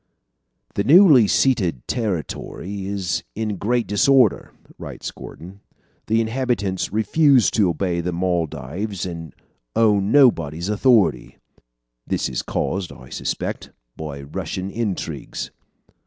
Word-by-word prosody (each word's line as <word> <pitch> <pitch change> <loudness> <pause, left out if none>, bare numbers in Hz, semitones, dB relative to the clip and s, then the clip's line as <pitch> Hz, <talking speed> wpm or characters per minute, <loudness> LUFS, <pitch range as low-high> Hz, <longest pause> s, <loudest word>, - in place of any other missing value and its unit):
"The 100 - 0
newly 145 - +7
ceded 95 - +1
territory 100 - -4
is 95 -6 -2
in 110 -2 -2
great 120 +4 0
disorder," 110 +4 +3 0.3
writes - - -7
Gordon. 95 +4 -11 0.5
"The 110 +1 +2
inhabitants 115 -5 -1
refuse 130 +4 +3
to 100 -5 +2
obey 85 +1 -1
the 90 +1 -2
Moldaves 85 +2 -2
and 85 -4 -6 0.4
own 105 -2 +3
nobody's 85 - +3
authority. 105 - +2 0.7
This - - -1
is 65 - -2
caused, 95 -2 -2
I 65 - -13
suspect, - - -4 0.2
by 70 -3 -7
Russian 95 +5 -5
intrigues." 110 -4 -4
100 Hz, 110 wpm, -21 LUFS, 85-115 Hz, 0.7 s, newly